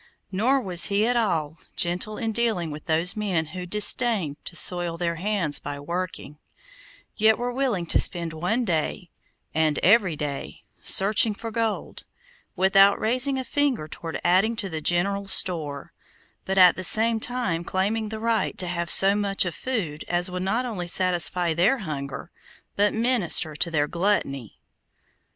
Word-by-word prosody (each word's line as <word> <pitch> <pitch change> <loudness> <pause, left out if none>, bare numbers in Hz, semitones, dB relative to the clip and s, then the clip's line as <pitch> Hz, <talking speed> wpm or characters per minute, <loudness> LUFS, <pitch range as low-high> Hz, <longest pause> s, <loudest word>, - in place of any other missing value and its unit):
Nor 240 +8 +1
was 180 -3 +2
he 205 +1 +1
at 245 +1 0
all 165 -9 -1 0.2
gentle 180 +5 -1
in 225 -1 -3
dealing 215 -8 -1
with 150 0 -10
those 165 +5 +1
men 190 -7 -2
who 180 -1 -7
disdained 210 - +2
to 170 - -6
soil 175 0 +3
their 170 -1 -3
hands 185 -5 -1
by 145 0 -7
working, 170 -1 -6 0.8
yet 220 0 +3
were 245 +1 -3
willing 245 -9 -1
to - - +1
spend 170 -3 +2
one 210 +10 -1
day, 175 +1 -3 0.4
and 155 -1 0
every 190 -4 +3
day, 145 -2 -6 0.2
searching 210 +2 +3
for 225 +2 -7
gold, 225 -1 -3 0.5
without 195 +2 +4
raising 255 +4 0
a 260 - -3
finger 260 - -1
toward 165 +1 -7
adding 190 +6 +2
to 205 -3 -4
the 160 -2 -5
general 195 +5 0
store, 155 -7 -1 0.5
but 190 0 -3
at 180 -2 +6
the 185 - -6
same 225 +4 +4
time 220 -9 -2
claiming 210 +5 -2
the 220 0 -6
right 230 0 -1
to 185 - -2
have 170 -1 -4
so 195 +3 +7
much 200 -2 +1
of 175 - -4
food 180 - -4
as 175 +1 -1
would 180 0 -4
not 220 +7 -1
only 195 -8 -5
satisfy 175 -1 +2
their 190 +11 +2
hunger, 145 - -7 0.4
but 205 +1 +2
minister 220 -9 +1
to 170 - -2
their 150 -3 0
gluttony. 170 - -2
185 Hz, 160 wpm, -24 LUFS, 170-220 Hz, 0.8 s, so